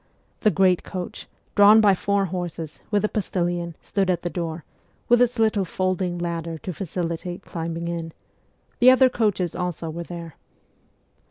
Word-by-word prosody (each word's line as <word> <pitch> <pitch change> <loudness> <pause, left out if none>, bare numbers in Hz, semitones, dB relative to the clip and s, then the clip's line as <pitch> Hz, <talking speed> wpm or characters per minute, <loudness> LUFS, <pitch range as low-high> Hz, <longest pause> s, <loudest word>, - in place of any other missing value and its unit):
The 215 - +4
great 190 -3 +3
coach, 180 -2 -6 0.3
drawn 205 +1 +7
by 205 -2 +6
four 200 +1 +1
horses, 170 -3 -5
with 210 -1 +2
a - - +3
postilion, 175 -5 -2
stood 195 -2 0
at 175 -2 0
the 175 - -2
door, 165 -2 -4 0.4
with 240 0 +5
its 245 0 +2
little 220 -3 +2
folding 185 0 -1
ladder 170 -1 -3
to 180 +3 -6
facilitate 175 0 -4
climbing 165 0 -4
in; 165 -1 -4 0.7
the 250 - +8
other 260 0 +6
coaches 205 -8 0
also 175 -2 -3
were 170 +2 -5
there. 170 -2 -8
180 Hz, 155 wpm, -24 LUFS, 170-200 Hz, 0.7 s, the